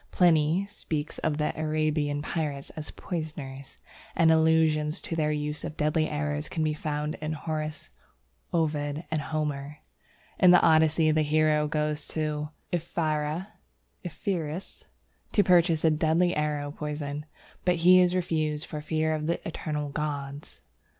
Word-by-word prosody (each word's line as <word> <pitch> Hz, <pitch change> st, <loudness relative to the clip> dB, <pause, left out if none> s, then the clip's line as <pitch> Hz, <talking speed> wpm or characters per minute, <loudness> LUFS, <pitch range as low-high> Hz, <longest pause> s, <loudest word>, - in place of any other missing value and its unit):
Pliny 170 Hz, +1 st, +3 dB
speaks 160 Hz, -7 st, -4 dB
of 150 Hz, -, 0 dB
the 150 Hz, 0 st, 0 dB
Arabian 155 Hz, -2 st, 0 dB
pirates 150 Hz, -4 st, -3 dB
as 155 Hz, -1 st, -7 dB
poisoners, 145 Hz, -5 st, -6 dB, 0.4 s
and 165 Hz, -1 st, +5 dB
allusions 160 Hz, -1 st, +3 dB
to 165 Hz, -, -4 dB
their 155 Hz, -2 st, +1 dB
use 150 Hz, 0 st, -2 dB
of 155 Hz, -, -6 dB
deadly 155 Hz, +1 st, +1 dB
arrows 150 Hz, 0 st, -2 dB
can 160 Hz, -, -1 dB
be 155 Hz, -1 st, +1 dB
found 150 Hz, 0 st, -3 dB
in 155 Hz, 0 st, -2 dB
Horace, 155 Hz, 0 st, -4 dB, 0.6 s
Ovid, 150 Hz, -1 st, -1 dB
and 155 Hz, -1 st, 0 dB
Homer. 150 Hz, -1 st, -3 dB, 0.6 s
In 185 Hz, -, +7 dB
the 180 Hz, 0 st, +8 dB
Odyssey, 160 Hz, 0 st, +4 dB
the 155 Hz, 0 st, +3 dB
hero 155 Hz, 0 st, +2 dB
goes 150 Hz, -1 st, -1 dB
to 150 Hz, -1 st, -2 dB, 0.2 s
Ephyra 160 Hz, +1 st, -1 dB, 0.5 s
(Epirus?) 175 Hz, -2 st, -4 dB, 0.5 s
to 205 Hz, -, +5 dB
purchase 170 Hz, -3 st, +4 dB
a 160 Hz, -, +5 dB
deadly 160 Hz, +3 st, +2 dB
arrow 150 Hz, -1 st, -1 dB
poison, 150 Hz, 0 st, -5 dB, 0.4 s
but 180 Hz, -1 st, +3 dB
he 185 Hz, 0 st, +9 dB
is 180 Hz, 0 st, +4 dB
refused 155 Hz, -4 st, -1 dB
for 150 Hz, -2 st, -6 dB
fear 155 Hz, +1 st, 0 dB
of 155 Hz, 0 st, -2 dB
the 170 Hz, -, -2 dB
eternal 150 Hz, -3 st, -3 dB
gods. 145 Hz, -1 st, -5 dB
155 Hz, 140 wpm, -28 LUFS, 150-160 Hz, 0.6 s, he